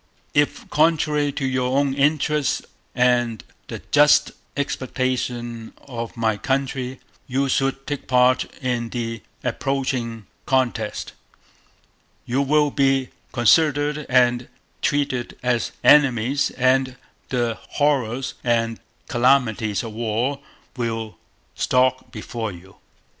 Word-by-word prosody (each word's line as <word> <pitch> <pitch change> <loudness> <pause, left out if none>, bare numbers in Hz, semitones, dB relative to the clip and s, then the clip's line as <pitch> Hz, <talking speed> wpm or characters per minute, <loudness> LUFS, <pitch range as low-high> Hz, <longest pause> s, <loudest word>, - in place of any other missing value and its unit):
If, 145 0 +1
contrary 150 -2 +2
to 135 - -2
your 130 0 0
own 140 -1 +2
interest 150 0 +1 0.3
and 120 -3 +2 0.2
the - - -7
just 150 0 +5 0.3
expectation 125 -4 -2
of 120 -3 -7
my 110 -2 +1
country, 130 +2 -2 0.3
you 135 +2 0
should 135 0 0
take 145 -2 -5
part 125 0 +4 0.2
in 120 -2 -1
the 115 -2 -4 0.2
approaching 125 -5 -2 0.2
contest, 130 -1 -1 1.1
you 130 +3 0
will 145 +1 +3
be 135 -2 +2 0.2
considered 145 +4 +3
and 125 -1 +3 0.3
treated 140 -5 -1
as 125 -2 0
enemies 135 -1 +4
and 130 0 +1 0.3
the 120 -3 -1
horrors 135 -4 0
and 115 -1 0 0.3
calamities 120 -4 +2
of 115 -2 -6
war 120 +5 -1 0.4
will 115 -4 -3 0.4
Stalk 130 0 +1
before 110 -1 -5
you. 95 +2 -14
130 Hz, 105 wpm, -22 LUFS, 120-140 Hz, 1.1 s, just